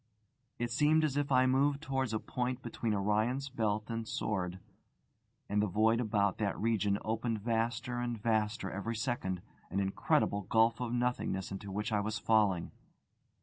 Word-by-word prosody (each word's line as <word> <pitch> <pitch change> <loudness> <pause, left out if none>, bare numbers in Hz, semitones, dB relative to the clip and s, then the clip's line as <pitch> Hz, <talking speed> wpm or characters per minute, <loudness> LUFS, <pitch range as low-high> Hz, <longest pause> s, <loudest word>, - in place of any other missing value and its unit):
It 120 0 -2
seemed 150 +5 +4
as 150 -3 +1
if 145 -1 0
I 130 -1 +5
moved 140 +2 +3
towards 135 -5 -1
a 110 - +1
point 125 +3 -3
between 115 -2 -2
Orion's 110 +7 0
belt 110 -4 -1
and 115 -1 -3
sword; 90 -5 -2 0.9
and 105 0 +1
the 105 - +2
void 110 +4 +3
about 100 -4 +1
that 100 -2 0
region 105 -3 +1
opened 115 0 -1
vaster 120 +2 -1
and 120 -2 -2
vaster 105 -3 0
every 100 +4 -3
second, 110 -7 -2 0.3
an 100 - -1
incredible 100 +1 +1
gulf 115 +4 +3
of 125 -2 -2
nothingness 120 -6 -1
into 100 0 -6
which 105 +3 -2
I 105 - +2
was 105 +2 -2
falling. 105 -6 +2
110 Hz, 160 wpm, -33 LUFS, 105-125 Hz, 0.9 s, I